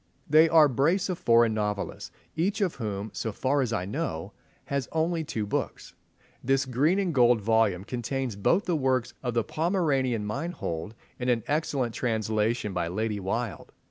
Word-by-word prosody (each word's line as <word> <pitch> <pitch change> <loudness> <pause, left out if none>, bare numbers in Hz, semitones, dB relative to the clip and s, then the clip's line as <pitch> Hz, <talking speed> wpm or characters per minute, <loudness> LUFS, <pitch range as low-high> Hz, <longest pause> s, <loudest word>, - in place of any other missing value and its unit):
They 155 +2 +6
are 160 -2 +7
a - - +2
brace 165 - +1
of 180 - -2
foreign 115 -1 +4
novelists, 105 -2 -3 0.3
each 190 +7 0
of 195 -5 +1
whom, 105 -3 -4
so 110 +4 -3
far 135 +7 0
as 125 -3 -1
I 90 -5 -1
know, 100 - -4 0.3
has 140 -3 -2
only 165 +1 0
two 110 -8 -3
books. 100 - -4 0.5
This 135 +1 +2
green 140 +8 +2
and 190 -4 0
gold 120 -3 +5
volume 110 -3 +2
contains 125 +1 -3
both 170 - +2
the 175 - +1
works 130 -4 0
of 125 -2 -3
the 115 - +2
Pomeranian 140 - 0
Meinhold 110 - -4 0.2
in 125 0 -1
an 120 -3 +2
excellent 145 -5 -1
translation 110 -2 -1
by 85 -2 -1
Lady 105 +4 -2
Wilde. 110 +3 -3
125 Hz, 170 wpm, -27 LUFS, 110-150 Hz, 0.5 s, are